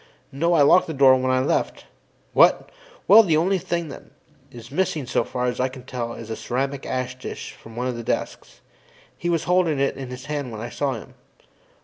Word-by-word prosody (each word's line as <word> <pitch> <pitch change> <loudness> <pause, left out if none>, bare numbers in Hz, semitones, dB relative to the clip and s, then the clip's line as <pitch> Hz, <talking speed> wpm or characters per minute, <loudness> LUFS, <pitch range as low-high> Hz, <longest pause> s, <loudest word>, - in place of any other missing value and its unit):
No, 170 +6 +1
I 150 - +5
locked 180 +6 +5
the 160 - -5
door 135 -1 +6
when 130 0 -1
I 130 0 +2
left. 135 - -1 0.5
What? - - +4 0.4
Well, 220 +3 +9
the 165 -8 +2
only 185 +4 +2
thing 170 -2 -3
that's 120 -3 -14
missing 160 -2 -1
as 125 - -9
far 125 +1 -1
as 125 -1 -2
I 130 - +2
can 130 -1 -10
tell 120 -2 -5
is 115 -1 -9
a - - -2
ceramic 135 +4 -3
ash 130 0 -3
tray - - -6
from 115 0 -11
one 125 +1 -3
of 125 -1 -2
the 115 - -5
desks; - - -4 0.5
he 175 - -3
was 165 -2 +1
holding 175 -4 +2
that 140 0 0
in 135 -2 -6
his 125 +1 -8
hand 145 -4 -4
when 110 - -7
I 120 +2 -5
saw 140 0 -1
him. 115 - -9
130 Hz, 215 wpm, -23 LUFS, 125-160 Hz, 0.5 s, Well